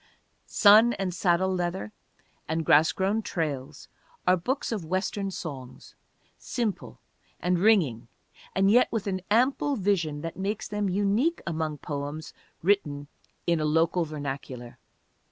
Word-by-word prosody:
Sun 220 +3 +6
and 190 -4 -3
Saddle 185 +1 +2
Leather 175 - -2 0.6
and 160 0 -1
Grass 155 +2 +5
Grown 200 +4 0
Trails 150 -10 -4 0.4
are 180 - +5
books 250 - -2
of 210 -6 -2
Western 190 +3 -2
songs, 135 -9 -8 0.5
simple 230 -5 -3 0.4
and 180 -1 +1
ringing 165 - +3 0.5
and 195 +1 +4
yet 245 +3 +4
with 225 -3 -2
an 190 -2 -2
ample 260 +6 +2
vision 180 - 0
that 165 +1 -6
makes 200 +3 -3
them 210 -1 -1
unique 205 - +1
among 160 -3 -2
poems 145 +1 -5 0.3
written 145 -7 +1 0.4
in 170 -2 +2
a 155 - 0
local 165 +3 +2
vernacular. 135 -5 -6
180 Hz, 130 wpm, -27 LUFS, 155-205 Hz, 0.6 s, Sun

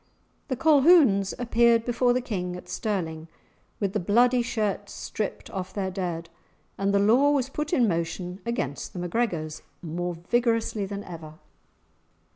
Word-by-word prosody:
The 260 - -1
Colquhouns 280 - +5
appeared 235 -1 +3
before 245 0 +2
the 250 +1 +1
King 180 -7 -3
at 180 - -10
Stirling 165 -7 -3 0.5
with 195 -2 -1
the - - +1
bloody 240 +7 +3
shirts 210 -4 -2
stripped 210 -1 -5
off 185 -1 -5
their 190 -2 -2
dead, 175 -3 -3 0.5
and 195 0 0
the 200 - +3
law 235 +8 +4
was 275 -3 +1
put 300 +2 -4
in 255 -9 +3
motion 175 +1 -3
against 230 - -3
the 180 - -6
MacGregors 175 -4 -2 0.2
more 175 +2 -3
vigorously 230 +2 0
than 200 +1 -5
ever. 160 -3 -9
200 Hz, 145 wpm, -26 LUFS, 180-240 Hz, 0.5 s, Colquhouns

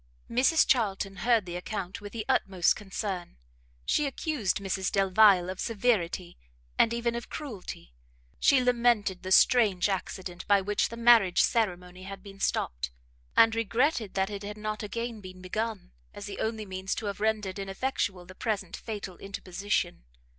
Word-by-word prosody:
Mrs 265 +7 +4
Charlton 195 -5 0
heard 230 -4 +2
the 175 -1 -6
account 190 +1 -5
with 205 0 -8
the 220 -1 -5
utmost 195 -9 +2
concern; 195 - -5 0.5
she 300 - +2
accused 275 - -1
Mrs 190 -1 -2
Delvile 195 -1 +5
of 185 0 -5
severity, 200 -6 -1 0.4
and 230 - +4
even 235 0 -1
of 235 0 -5
cruelty; 215 - -7 0.5
she 275 - +5
lamented 235 -6 +2
the 185 - -6
strange 210 -4 +5
accident 185 -1 -4
by 200 -1 +5
which 205 +2 0
the 230 - -8
marriage 230 -6 +5
ceremony 180 -5 -1
had 195 0 -8
been 195 -1 -12
stopt, - - -1 0.5
and 225 -1 +7
regretted 230 0 0
that 195 +1 0
it 200 -1 -5
had 205 +1 -6
not 215 0 -4
again 230 +1 -4
been 185 -1 -10
begun, 215 - -4 0.2
as 205 - -7
the 205 -1 -7
only 220 -1 -2
means 190 0 -3
to 220 - -5
have 200 -1 -4
rendered 210 -3 -1
ineffectual 195 -2 -2
the 185 - -12
present 195 -3 -3
fatal 205 -5 -6
interposition. 195 - -3
205 Hz, 155 wpm, -28 LUFS, 185-230 Hz, 0.5 s, and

